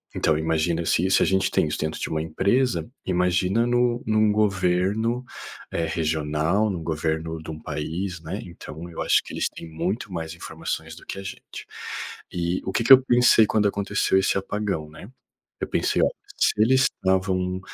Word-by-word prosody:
então, 80 - +2
imagina 80 +1 0
se 85 - +2
isso 95 - +3
a - - +3
gente 95 0 +2
tem - - +2
isso 75 - -2
dentro 80 0 -2
de - - -2
uma 80 -1 -1
empresa, 100 +12 0 0.2
imagina 90 +4 +2
no 120 0 +1
num 110 -1 +3
governo, 105 +3 +1 0.5
eh, 85 - -1
regional, 80 +4 0
no 90 -4 -3
governo 80 0 -2
de 80 - -10
um 80 - -7
país, 80 +4 -4
né. 85 +6 -5
Então, 85 -1 -9
eu 85 - -6
acho - - +3
que - - -10
eles - - 0
têm 85 - -10
muito 90 +7 -3
mais 80 -1 -4
informações 85 - -5
do - - -14
que 95 - -6
a - - -7
gente. 95 - -9 0.7
E 90 +1 -1
o 95 - -2
que - - +1
que 125 - +1
eu 130 - +9
pensei 120 -3 +5
quando 105 -1 +2
aconteceu 100 -1 0
esse 95 - +1
apagão, 95 -5 -3
né. 75 +7 -12 0.5
Eu - - -1
pensei: - - +1
"Ó, - - +4 0.3
se - - +3
eles 130 +4 +5
estavam 95 -2 0
90 Hz, 185 wpm, -24 LUFS, 80-105 Hz, 0.7 s, eu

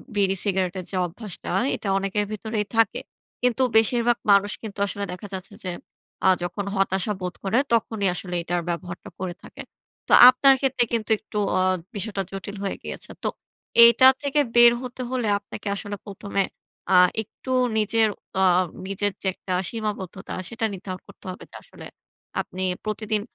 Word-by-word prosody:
বিড়ি-সিগারেটের 190 -2 0
যে - - -4
অভ্যাসটা, 190 +2 -7 0.2
এটা 215 -2 -7
অনেকের 195 +1 -1
ভিতরেই 215 0 -3
থাকে। 225 -3 +3 0.4
কিন্তু 250 +1 +2
বেশিরভাগ 235 +1 +3
মানুষ 200 +1 +4
কিন্তু 205 -2 -7
আসলে 200 +1 -4
দেখা 185 +3 -8
যাচ্ছে 190 +2 -6
যে 180 - -2 0.6
আ - - +7
যখন 180 +3 -3
হতাশা 195 +1 +1
বোধ 180 -1 -3
করে 200 +4 +1 0.2
তখনই 220 -3 +1
আসলে 180 -1 -4
এটার 175 +1 -1
ব্যবহারটা 175 +1 -5
করে 180 -1 -3
থাকে। - - -10 0.5
তো - - +3 0.2
আপনার 270 +2 +6
ক্ষেত্রে 265 -2 +2
কিন্তু 225 -1 -1
একটু 215 - -8 0.2
আ - - +3 0.3
বিষয়টা 205 -1 -2
জটিল 195 +1 -6
হয়ে 195 - -2
গিয়েছে। - - -6
তো - - +1 0.5
এইটা 235 +2 +8 0.2
থেকে 285 +1 +1 0.2
বের 240 0 +8
হতে 250 0 -7
হলে 245 -4 -1
আপনাকে 205 - -9
আসলে 205 0 -5
প্রথমে 200 0 -2 0.5
আ - - +7 0.3
একটু 260 +5 -9 0.3
নিজের 220 +1 +3 0.3
অ - - +4 0.4
নিজের 200 +1 -1
যে 190 - -2
একটা 185 - -5 0.2
সীমাবদ্ধতা 210 -4 -5 0.2
সেটা 225 -1 -2
নির্ধারণ 185 -1 -7
করতে - - -17
হবে। 185 - -10
যে - - -14
আসলে - - -13 0.6
আপনি 185 +1 -6 0.2
প্রতিদিন 215 0 -1
205 Hz, 155 wpm, -24 LUFS, 190-225 Hz, 0.6 s, এইটা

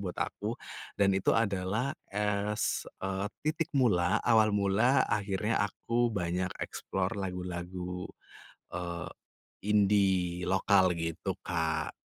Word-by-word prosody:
buat 90 -3 -4
aku. - - -3 0.4
Dan 100 -1 +4
itu 95 0 +2
adalah 105 +4 0 0.2
as, 105 +1 -1 0.2
eee, 95 +1 -1 0.2
titik 155 +1 0
mula, 90 -9 +3
awal 110 -3 +5
mula 105 +5 +3
akhirnya 105 +1 0
aku 120 +3 0
banyak 90 -3 -1 0.2
explore 95 0 -3
lagu-lagu, 90 -1 -4 0.6
eee, 85 0 -4 0.6
indie 95 -4 +3
lokal, 95 -1 +4
gitu 85 +3 -3
Kak. 80 -2 -1
95 Hz, 105 wpm, -31 LUFS, 90-105 Hz, 0.6 s, awal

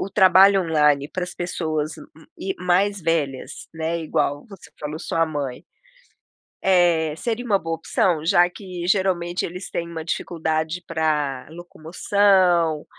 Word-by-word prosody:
o - - -3
trabalho 195 0 +6
online, 150 -4 +2
para 180 +2 -3
as 180 - -9
pessoas 155 -3 -3 0.5
e 190 0 -3
mais 190 +3 +1
velhas, 155 -6 -2
né, 160 +1 -2
igual 145 -3 -1
você 195 -2 -14
falou, 150 +1 -5
sua 165 0 0
mãe, 145 -5 -5 1.0
é, 175 -4 +3
seria 235 +6 -3
uma 205 -4 +3
boa 165 0 -3
opção? 165 0 0
Já 175 0 +4
que, 180 -2 -8
geralmente, 180 -2 0
eles 180 +3 -8
têm 170 0 -3
uma 165 -1 -6
dificuldade 160 0 -2
para 150 -5 -1
locomoção, 175 0 +1
170 Hz, 135 wpm, -22 LUFS, 155-185 Hz, 1.0 s, trabalho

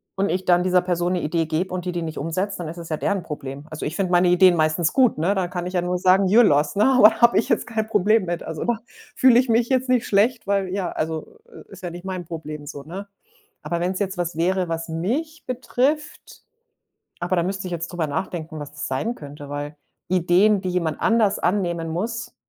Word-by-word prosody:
und 195 +1 +1
ich 185 +1 -1
dann 175 -1 +4
dieser 180 0 +3
Person 175 0 -1
'ne 180 - -1
Idee 165 +2 0
gebe 165 +4 -2
und 180 -1 -4
die 180 - -2
die 175 - -2
nicht 160 -1 -5
umsetzt, 185 +6 -2
dann 170 - -4
ist 160 - -6
es 170 -1 -8
ja 155 - -1
deren 195 +1 -1
Problem. 140 -3 -7
Also, 155 - -6
ich 155 - -3
finde 190 -3 -1
meine 180 0 +4
Ideen 180 0 +6
meistens 155 +1 +1
gut, 255 -3 +3
ne, 175 +6 +1
da 190 -2 0
kann 175 0 -4
ich 185 - -6
ja 180 - +2
nur 180 +1 -1
sagen: 185 +2 +4
„Your 240 - +8
loss,“ 150 -6 +2
ne? 205 - +3
Aber 250 -5 +7
habe 235 0 +6
ich 220 - -1
jetzt - - +1
kein 220 -2 -2
Problem 215 0 +2
mit. 175 -1 -3
Also, 160 -1 -5
da 240 -1 +1 0.4
fühle 250 -2 +6
ich 255 - +1
mich 230 +1 +2
jetzt 260 -1 +1
nicht 250 -2 +2
schlecht, 215 +3 +2
weil 200 -1 +1
ja, 185 -1 -2
also, 160 - -4
i 450 - -13
ist 195 -1 -12
ja 175 - -4
nicht 175 +1 -9
mein 185 -2 -4
Problem 155 -2 -7
so, 140 -1 -8
ne? 190 +7 -8 0.5
Aber 170 - -3
wenn's 185 +2 -1
jetzt 195 -2 -2
was 175 -2 -2
wäre, 185 +2 +1
was 165 0 -3
mich 265 - -3
betrifft 260 +4 -2 0.8
aber 180 +1 -1
da 170 - +2
müsste 190 +1 -3
ich - - -7
jetzt 170 -1 -3
drüber 175 -3 -2
nachdenken, 160 0 -4
was 145 -1 -7
das 155 - -5
sein 210 - -2
könnte. 145 -3 -10
Weil 145 +1 -5 0.3
Ideen, 185 +3 +3
die 185 - -4
jemand 170 -4 -1
anders 225 -3 +2
annehmen 175 -3 0
muss, 230 +9 -4
180 Hz, 235 wpm, -23 LUFS, 165-205 Hz, 0.8 s, Your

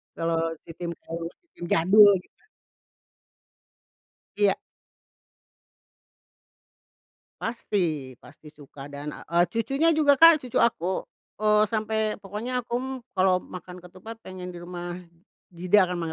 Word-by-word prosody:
Kalau, 165 0 -1 0.2
ti - - -15
tim 175 -1 -4
jaul 165 0 -6 0.3
tim 175 - -7
jadul, 205 +5 +7
gitu. - - -31 2.0
Iya. 205 -1 +3 2.9
Pasti 170 - -2
pasti 155 +2 -17
suka 145 -2 -12
dan, 145 +1 -7
eee, 170 +3 0
cucunya 275 - +1
juga 305 -3 +4
Kak, 330 +2 +8
cucu 245 - -1
aku, 190 -5 0 0.4
eee, 210 0 +5
sampai 220 0 -1 0.2
pokoknya 230 +6 -4
aku 235 +1 -6
m 260 - -5 0.2
kalau 185 -1 +2
makan 180 0 -10
ketupat 185 +6 -11
pengen 180 -1 -8
di - - -8
rumah 175 0 -6 0.6
Jida 185 +4 +4
kan, 180 -1 -4
pada - - -3
185 Hz, 120 wpm, -26 LUFS, 170-220 Hz, 2.9 s, Kak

